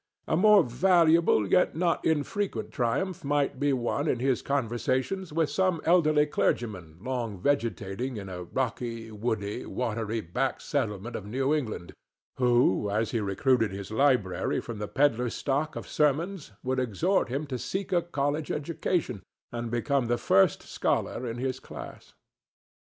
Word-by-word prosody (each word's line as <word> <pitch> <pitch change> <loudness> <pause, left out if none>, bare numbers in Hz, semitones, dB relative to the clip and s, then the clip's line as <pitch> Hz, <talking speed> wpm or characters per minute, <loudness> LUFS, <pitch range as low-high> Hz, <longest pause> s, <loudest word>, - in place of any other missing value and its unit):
A - - +1
more 205 +2 +6
valuable 165 - +4
yet 180 - +3
not 170 +1 +1
infrequent 160 +6 -1
triumph 175 +10 -1
might 145 -2 0
be 145 0 +2
won 125 -3 -1
in - - +1
his 130 +1 +1
conversations 130 - -1
with 160 0 0
some 185 -3 +1
elderly 155 -3 +4
clergyman 95 - -1
long 120 -2 -3
vegetating 120 -1 -1
in 100 -2 -6
a 90 -1 -6
rocky, 115 0 -3
woody, 105 0 -2
watery 115 -2 -2
back 115 +8 -2
settlement 115 -5 -2
of 100 - -6
New 135 +6 0
England, 115 -12 -3 0.4
who 120 -5 +3
as 110 +2 0
he 115 - 0
recruited 110 +2 +1
his 100 +1 -7
library 125 -6 +2
from 115 -3 -7
the 105 - -3
pedler's 125 -3 +1
stock 145 +3 -1
of - - -6
sermons 155 - 0
would 130 0 0
exhort 130 - +1
him 140 +5 -2
to 130 -4 -4
seek 190 - -3
a 175 - +4
college 150 -2 -2
education 150 - -2 0.3
and 120 -1 -4
become 120 +2 0
the 120 +1 +1
first 95 - +3
scholar 125 - -1
in 115 0 -4
his 130 +1 -2
class. - - -10
130 Hz, 150 wpm, -28 LUFS, 115-150 Hz, 0.4 s, more